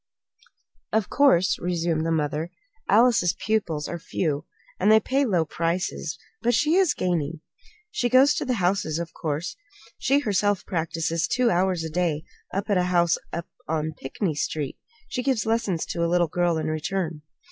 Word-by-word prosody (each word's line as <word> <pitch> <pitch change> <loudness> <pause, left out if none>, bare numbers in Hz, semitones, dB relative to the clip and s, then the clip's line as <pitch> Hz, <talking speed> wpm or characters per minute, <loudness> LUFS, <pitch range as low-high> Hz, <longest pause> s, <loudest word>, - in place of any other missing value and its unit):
"Of 220 -3 0
course," 225 -11 +4
resumed 170 -2 0
the - - 0
mother, 155 +1 -1 0.4
"Alice's 210 -5 +4
pupils 175 -9 -1
are 170 - -5
few, 155 -2 -2 0.3
and 205 +3 +4
they 220 - +8
pay 270 +6 +1
low 180 -8 +2
prices; 170 +3 -2 0.2
but 240 0 +2
she 300 +6 +2
is 375 -2 +4
gaining. 165 -3 -1 0.5
She 245 -13 0
goes 265 +4 +6
to - - -2
the 250 -2 0
houses, 180 -5 0
of 170 0 -5
course. 155 +2 -3 0.4
She 275 +1 +3
herself 205 -6 +1
practises 165 0 -1
two 250 -1 +2
hours 180 -1 +1
a 160 - -3
day 165 -3 0 0.3
at 195 +1 -2
a 185 -4 +2
house 175 -2 +2
up 170 0 -4 0.2
on 155 0 -1
Pinckney 160 +6 -3
Street. 145 -1 -3 0.3
She 250 - -3
gives 255 -4 0
lessons 220 -7 0
to 170 - -2
a 170 - +1
little 175 0 +3
girl 175 +1 +1
in 155 - -2
return." 160 +1 -2
175 Hz, 165 wpm, -25 LUFS, 160-215 Hz, 0.5 s, they